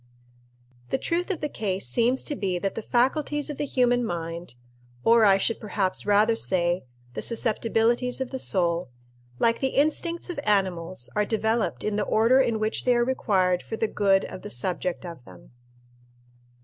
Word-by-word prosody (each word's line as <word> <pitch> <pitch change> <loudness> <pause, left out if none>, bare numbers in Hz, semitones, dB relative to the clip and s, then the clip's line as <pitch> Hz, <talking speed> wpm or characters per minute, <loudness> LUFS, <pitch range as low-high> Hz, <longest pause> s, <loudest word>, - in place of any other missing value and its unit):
The - - +1
truth 345 +7 -2
of 385 - -2
the 300 - 0
case 195 -8 -2
seems 235 - +2
to 295 - -3
be 190 -7 -1
that 195 +2 -2
the - - -4
faculties 290 +6 0
of 290 - -9
the 290 - -1
human 245 -2 +2
mind 170 - -5 0.5
or 230 -1 +5
I 195 -1 +6
should 225 +3 0
perhaps 200 -2 -2
rather 210 +2 +4
say, 175 -6 0 0.3
the - - -4
susceptibilities 230 +2 0
of 260 -1 -4
the 265 - -4
soul 175 - 0 0.5
like 230 - +2
the 265 -1 -2
instincts 335 +4 0
of 335 - -5
animals, 185 - -1
are 210 - +3
developed 220 +2 -1
in 210 -1 -1
the 210 - 0
order 230 +4 +4
in 235 -4 +2
which 215 0 -2
they 250 -1 +3
are 240 0 +2
required 190 -8 +1
for - - -6
the 220 - 0
good 195 -2 +2
of - - -8
the - - -8
subject 175 +9 -3
of 170 -7 -9
them. 90 -1 -15
220 Hz, 175 wpm, -25 LUFS, 185-245 Hz, 0.5 s, I